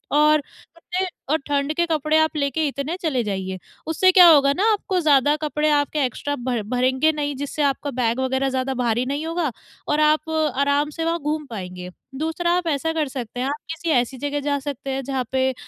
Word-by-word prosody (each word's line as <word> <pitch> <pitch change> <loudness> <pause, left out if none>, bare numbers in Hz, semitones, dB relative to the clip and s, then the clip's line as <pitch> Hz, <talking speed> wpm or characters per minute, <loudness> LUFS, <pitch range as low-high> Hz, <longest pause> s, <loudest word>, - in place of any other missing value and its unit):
और 300 0 +5
कपड़े 345 +6 -6 0.2
और 315 - +3
ठंड 285 +1 0
के 345 +1 +2
कपड़े 310 -1 +1
आप 315 0 +2
लेके 285 +2 0
इतने 280 +4 -3
चले 270 -8 0
जाइए, 190 -2 -3 0.3
उससे 370 +4 +4
क्या 360 -1 +8
होगा 285 -4 +6
ना, 370 - -1
आपको 380 -2 -1
ज़्यादा 290 -2 +4
कपड़े 305 0 -1
आपके 295 +1 +1
एक्स्ट्रा 285 +4 -3
भर 245 -3 -1
भरेंगे 260 +5 +2
नहीं 290 -2 -3
जिससे 285 +2 -4
आपका 280 +1 -4
बैग 240 -1 0
वग़ैरह 265 +1 0
ज़्यादा 260 0 -1
भारी 240 +1 +1
नहीं 285 +4 -3
होगा 330 -3 -1 0.4
और 300 - +1
आप 305 +1 +2 0.3
आराम 285 +1 +2
से 325 +2 -5
वहाँ 335 +1 0
घूम 300 0 -2
पाएँगे। 180 -6 -7 0.3
दूसरा 320 +4 -1
आप 355 -2 -2
ऐसा 320 +2 0
कर 310 -3 0
सकते 245 -3 -6
हैं, 255 - -1
आप 285 - -1 0.2
किसी 325 +1 -4
ऐसी 245 +2 0
जगह 290 +2 -2
जा 285 0 0
सकते 275 -1 -6
हैं, 265 0 -2
जहाँ 265 -1 -2
पे 260 0 +1
285 Hz, 205 wpm, -22 LUFS, 260-315 Hz, 0.4 s, क्या